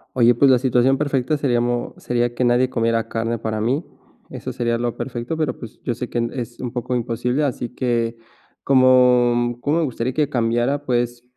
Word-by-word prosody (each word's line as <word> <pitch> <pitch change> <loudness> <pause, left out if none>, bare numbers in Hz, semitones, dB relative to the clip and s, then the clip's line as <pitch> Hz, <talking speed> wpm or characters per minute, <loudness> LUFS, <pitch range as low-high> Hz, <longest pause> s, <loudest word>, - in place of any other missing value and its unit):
Oye, 120 -1 +5
pues 135 +4 +4
la 130 - +6
situación 130 +1 +2
perfecta 140 0 0
seríamo 120 -3 0
sería 120 0 -1
que 125 - -1
nadie 125 +1 +3
comiera 115 -2 0
carne 115 +1 -2
para 110 -1 -3
mí. 130 +9 0 0.5
Eso - - -6
sería 120 -1 -1
lo 120 0 -2
perfecto, 125 +4 -4
pero 155 -2 -1
pues 115 -2 -11
yo 120 - -1
sé 125 +1 -6
que - - -4
en 115 0 -1
es 120 -2 -6
un 125 - -4
poco 125 0 -3
imposible, 125 +3 -1
así 125 -4 -2
que 120 -2 -1 0.5
¿cómo 125 -2 +4
cómo 145 +5 +1
me - - +1
gustaría 130 -3 -2
que 150 +1 +1
cambiara? 120 +2 0
Pues, 120 -1 -1
120 Hz, 190 wpm, -21 LUFS, 120-130 Hz, 0.5 s, la